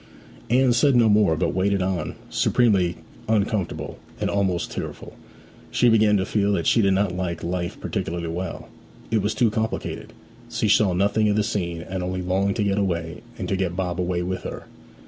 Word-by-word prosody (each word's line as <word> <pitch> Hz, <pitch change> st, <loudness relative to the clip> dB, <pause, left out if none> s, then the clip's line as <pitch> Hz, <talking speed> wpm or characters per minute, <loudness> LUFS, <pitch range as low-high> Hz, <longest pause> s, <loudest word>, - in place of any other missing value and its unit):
Anne 125 Hz, +1 st, +4 dB
said 130 Hz, +3 st, +4 dB
no 120 Hz, -2 st, +5 dB
more, 105 Hz, -6 st, +4 dB
but -, -, 0 dB
waited 100 Hz, +2 st, +1 dB
on, 90 Hz, -4 st, -2 dB
supremely 95 Hz, -8 st, +2 dB, 0.3 s
uncomfortable, 105 Hz, -3 st, -1 dB, 0.2 s
and -, -, -1 dB
almost 95 Hz, -3 st, 0 dB
tearful. -, -, -6 dB, 0.6 s
She 120 Hz, -, +3 dB
began 110 Hz, -2 st, +4 dB
to 95 Hz, -, 0 dB
feel 105 Hz, -1 st, +1 dB
that 85 Hz, -4 st, -1 dB
she 115 Hz, -, +4 dB
did 95 Hz, -2 st, +3 dB
not 95 Hz, -2 st, 0 dB
like 85 Hz, -2 st, -3 dB
life 85 Hz, 0 st, -3 dB
particularly 85 Hz, 0 st, -3 dB
well; 85 Hz, +1 st, -5 dB, 0.4 s
it 110 Hz, -2 st, +2 dB
was 105 Hz, +2 st, -1 dB
too 115 Hz, -3 st, +3 dB
complicated: 110 Hz, +1 st, -3 dB, 0.4 s
she -, -, -1 dB
saw 100 Hz, -2 st, +4 dB
nothing 105 Hz, +4 st, +2 dB
of 105 Hz, -, +2 dB
the 105 Hz, -, +2 dB
scene, 85 Hz, -5 st, -2 dB
and 95 Hz, 0 st, -4 dB
only 90 Hz, 0 st, -3 dB
longed 95 Hz, +3 st, 0 dB
to 110 Hz, -, 0 dB
get 100 Hz, 0 st, +1 dB
away, 85 Hz, -4 st, -2 dB, 0.2 s
and -, -, -4 dB
to -, -, 0 dB
get 95 Hz, -2 st, -1 dB
Bob 90 Hz, -2 st, -2 dB
away 90 Hz, 0 st, -1 dB
with 95 Hz, +1 st, -3 dB
her. -, -, -7 dB
95 Hz, 185 wpm, -24 LUFS, 90-105 Hz, 0.6 s, no